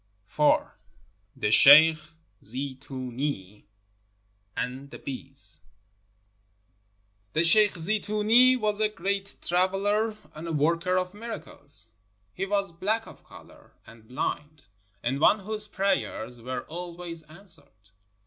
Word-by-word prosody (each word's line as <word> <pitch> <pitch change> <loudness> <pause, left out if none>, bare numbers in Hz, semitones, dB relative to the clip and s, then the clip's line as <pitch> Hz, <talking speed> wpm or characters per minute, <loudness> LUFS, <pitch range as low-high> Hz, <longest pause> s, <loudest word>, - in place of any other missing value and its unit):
IV. 150 0 +2 0.6
THE 105 - -1
SHEIKH 155 +6 +7 0.3
ZEETOONEE 130 -4 -5 0.9
AND 130 +3 -4
THE - - -9
BEES 135 - -3 1.7
The 160 - +2
sheikh 205 +4 +5
Zeetoonee 215 +7 +4
was 210 -3 -1
a 215 - +3
great 200 0 -3
traveler 200 +5 +1 0.2
and 160 +2 -8
a 165 - -3
worker 170 +5 +1
of 185 0 -2
miracles. 145 - -6 0.4
He 195 +1 -3
was 200 -2 0
black 215 +7 -1
of - - -14
color - - -16
and 115 -1 -16
bHnd, 145 +3 -5 0.3
and 130 +3 -1
one 205 +7 +4
whose 210 +1 -2
prayers 185 - -2
were 130 +2 -4
always 170 0 -7
answered. 155 - -7
165 Hz, 110 wpm, -27 LUFS, 135-200 Hz, 1.7 s, SHEIKH